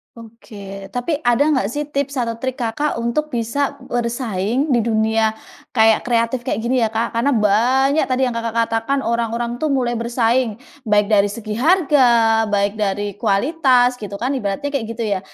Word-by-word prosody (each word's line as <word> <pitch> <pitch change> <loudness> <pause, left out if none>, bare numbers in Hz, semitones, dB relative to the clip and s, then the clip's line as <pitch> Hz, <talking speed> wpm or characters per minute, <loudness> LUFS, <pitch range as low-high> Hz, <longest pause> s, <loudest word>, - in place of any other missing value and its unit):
Oke, 205 -4 -11
tapi 280 +5 -1
ada 245 0 +3
nggak 260 -9 +1
sih 290 +5 -3
tips 280 0 -2
atau 230 -1 -3
trik 260 -1 -2
Kakak 245 +5 -2
untuk 235 +6 -1
bisa 250 +3 -2
bersaing 240 +2 -1
di 240 - +3
dunia 220 0 +1 0.5
kayak 220 -1 +4
kreatif 235 +1 +1
kayak - - -2
gini, 250 +1 +1
ya, 225 - +2
Kak? 225 +2 -2
Karena 230 +5 +1
banyak 250 +8 +2
tadi 255 +1 +1
yang 250 - -2
Kakak 230 -1 -4
katakan 230 +5 -1
orang-orang 235 +1 -2
tuh 310 - 0
mulai 255 -3 0
bersaing, 235 -1 0 0.3
baik 210 0 +4
dari 205 -1 +4
segi 215 0 -6
harga, 240 - +3
baik 200 0 +1
dari 205 0 -1
kualitas 250 - +2
gitu 205 -1 -6
kan 250 +6 -2
ibaratnya 255 +3 -2
kayak 270 -5 -1
gitu 230 0 -4
ya. 200 -3 -1
235 Hz, 170 wpm, -19 LUFS, 220-260 Hz, 0.5 s, kayak